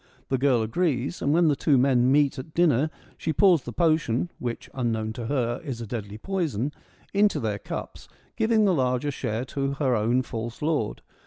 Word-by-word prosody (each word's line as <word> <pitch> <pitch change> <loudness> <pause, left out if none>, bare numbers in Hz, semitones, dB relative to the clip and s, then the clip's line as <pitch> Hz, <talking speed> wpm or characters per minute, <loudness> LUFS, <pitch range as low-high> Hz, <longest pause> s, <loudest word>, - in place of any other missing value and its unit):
The 130 - +1
girl 130 -4 +3
agrees, 140 +4 -1
and 140 - +1
when 170 +2 +4
the 145 - +3
two 140 0 +3
men 125 -1 +3
meet 140 -1 +3
at 145 +4 -9
dinner 155 -4 +3 0.3
she 160 - -1
pours 175 0 +4
the 120 - -7
potion 155 0 +1
(which, 120 -2 -4
unknown 110 -4 -1
to 115 -1 -5
her, 125 0 -1
is 135 -7 -5
a 115 - -5
deadly 105 -2 -5
poison) 150 - -2 0.4
into 205 +1 +3
their 105 -3 -2
cups, - - -7 0.3
giving 220 -1 +3
the 190 - +4
larger 130 -1 0
share 115 -2 -3
to 135 +1 -2
her 135 -3 +1
own 120 +4 +2
false 115 +2 -6
lord. 150 -9 -1
130 Hz, 185 wpm, -26 LUFS, 120-155 Hz, 0.4 s, when